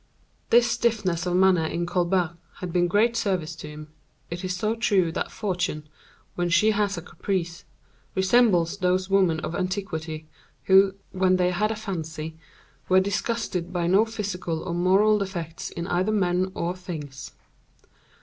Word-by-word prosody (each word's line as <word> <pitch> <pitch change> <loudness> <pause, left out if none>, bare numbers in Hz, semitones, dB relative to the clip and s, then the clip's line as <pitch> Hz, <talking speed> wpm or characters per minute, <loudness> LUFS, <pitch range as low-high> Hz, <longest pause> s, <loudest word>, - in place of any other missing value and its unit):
This 235 +1 +6
stiffness 210 -8 0
of 175 - 0
manner 185 -3 +4
in 170 +2 -2
Colbert 175 -1 0 0.2
had 180 -2 -6
been 175 -1 +3
of - - -1
great 225 +5 +3
service 180 -7 -1
to 150 - -8
him; 150 0 -9 0.4
it 175 +2 -5
is 185 0 -2
so 215 +4 0
true 195 -7 +2
that 170 - -3
Fortune, 180 -7 -3 0.5
when 175 0 -1
she 210 +5 +4
has 205 -2 0
a 170 - -6
caprice, 175 -2 -3 0.5
resembles 190 -3 +3
those 185 0 0
women 185 -5 +3
of 165 - -4
antiquity, 170 -5 -3 0.4
who, 195 0 +5 0.2
when 185 -1 +2
they 180 0 +2
had 210 +4 +1
a 220 - -2
fancy, 160 -6 -5 0.5
were 185 0 +6
disgusted 195 -2 -2
by 175 -2 -1
no 190 +5 +5
physical 195 -7 -4
or 170 - -4
moral 195 +5 +4
defects 175 -5 -5
in 170 - -5
either 185 +3 0
men 185 -2 +1
or 175 +2 -2
things. 150 -8 -8
185 Hz, 160 wpm, -25 LUFS, 170-200 Hz, 0.5 s, This